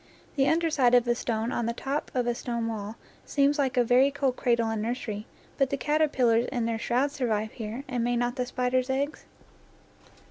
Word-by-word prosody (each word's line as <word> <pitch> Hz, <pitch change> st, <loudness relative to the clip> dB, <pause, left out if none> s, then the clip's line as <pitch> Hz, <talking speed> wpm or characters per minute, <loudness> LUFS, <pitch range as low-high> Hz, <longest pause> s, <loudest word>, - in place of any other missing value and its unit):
The 275 Hz, -2 st, +3 dB
under 330 Hz, 0 st, +2 dB
side 250 Hz, -5 st, +4 dB
of 245 Hz, -1 st, +4 dB
a 240 Hz, -, +4 dB
stone 230 Hz, -1 st, -2 dB
on 235 Hz, -, -1 dB
the 235 Hz, -, -1 dB
top 275 Hz, +5 st, -3 dB
of 250 Hz, -1 st, +1 dB
a 240 Hz, -, +1 dB
stone 235 Hz, -1 st, -3 dB
wall 215 Hz, -1 st, -5 dB, 0.3 s
seems 285 Hz, +1 st, +1 dB
like 265 Hz, -3 st, 0 dB
a 245 Hz, -, +5 dB
very 250 Hz, +4 st, +4 dB
cold 275 Hz, -2 st, -1 dB
cradle 235 Hz, -2 st, +1 dB
and 220 Hz, -1 st, -2 dB
nursery, 220 Hz, -2 st, -4 dB, 0.3 s
but 275 Hz, -1 st, +3 dB
the 280 Hz, -, -1 dB
caterpillars 265 Hz, -5 st, +2 dB
in 245 Hz, -3 st, -1 dB
their 230 Hz, -1 st, -1 dB
shrouds 255 Hz, +5 st, 0 dB
survive 220 Hz, -5 st, -1 dB
here, 225 Hz, +3 st, -6 dB
and 250 Hz, -3 st, -1 dB
may 245 Hz, +1 st, +1 dB
not 245 Hz, +1 st, 0 dB
the 250 Hz, -2 st, -2 dB
spiders' 255 Hz, +1 st, 0 dB
eggs? 280 Hz, +3 st, -2 dB
245 Hz, 205 wpm, -27 LUFS, 230-270 Hz, 0.3 s, a